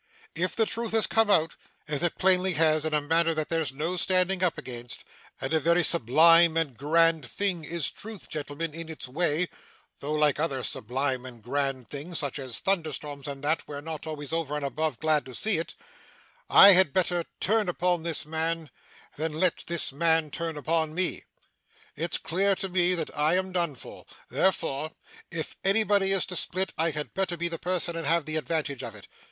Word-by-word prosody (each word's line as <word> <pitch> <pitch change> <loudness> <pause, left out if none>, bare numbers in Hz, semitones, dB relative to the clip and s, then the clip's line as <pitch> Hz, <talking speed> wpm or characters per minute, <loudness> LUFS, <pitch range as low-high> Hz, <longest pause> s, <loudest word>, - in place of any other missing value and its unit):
If 185 +2 -2
the 225 - +2
truth 230 0 -3
has 225 -1 +4
come 225 -1 +2
out, 165 -4 +3 0.3
as 150 -2 -2
it 175 - -1
plainly 185 0 +3
has 155 0 +2
in 155 - -1
a 150 - +2
manner 165 +2 +1
that 155 -1 -2
there's 165 -4 -1
no 160 +7 -3
standing 185 +1 +1
up 180 - +1
against 120 -1 -7 0.4
and 135 - -3
a 160 - +3
very 170 +3 +3
sublime 165 +4 +5
and 155 -6 -1
grand 160 +4 +2
thing 185 +3 -1
is 165 -1 -1
Truth, 215 -3 -10
gentlemen, 150 +1 -5
in 165 0 -7
its 160 -4 -6
way, 165 +4 +1 0.5
though 145 +2 -4
like 150 -2 +2
other 140 -5 -1
sublime 130 +2 -2
and 120 -4 -11
grand 135 0 -2
things, 155 +4 -5
such 140 0 -2
as 130 -4 -5
thunder 175 -5 0
storms 145 -1 -6
and 140 -1 -6
that, 155 +3 0
we're 145 -1 -6
not 160 +1 -7
always 150 -1 -5
over 160 -3 -2
and 150 -1 -3
above 155 +3 -2
glad 155 -1 +2
to 130 - -10
see 210 -6 +3
it 165 - -6 0.7
I 200 - +10
had 185 -6 +5
better 175 -2 +1 0.2
turn 210 -1 +1
upon 180 -1 0
this 160 -3 -1
man 160 0 -3 0.5
than 155 +1 -2
let 170 +3 0
this 170 -4 0
man 160 0 +1
turn 165 0 -4
upon 160 +1 -1
me. 185 0 -1 0.7
It's 165 +2 -1
clear 195 +3 +1
to 195 - -3
me 180 0 +3
that 160 -3 -4
I 155 +3 +2
am 185 0 -1
done 170 -5 -1
for. - - -11 0.3
Therefore, 155 -5 0 0.4
if 165 -2 -5
anybody 200 -1 +3
is 195 -1 +2
to 180 - -6
split, 185 +2 -2
I 165 +1 +1
had 150 -1 -5
better 190 -2 -1
be 170 +1 -1
the 165 -1 -5
person 175 -1 -1
and 165 - -4
have 165 -2 +2
the 155 0 -2
advantage 155 -4 -2
of 115 -2 -7
it. 105 - -12
160 Hz, 195 wpm, -27 LUFS, 150-180 Hz, 0.7 s, I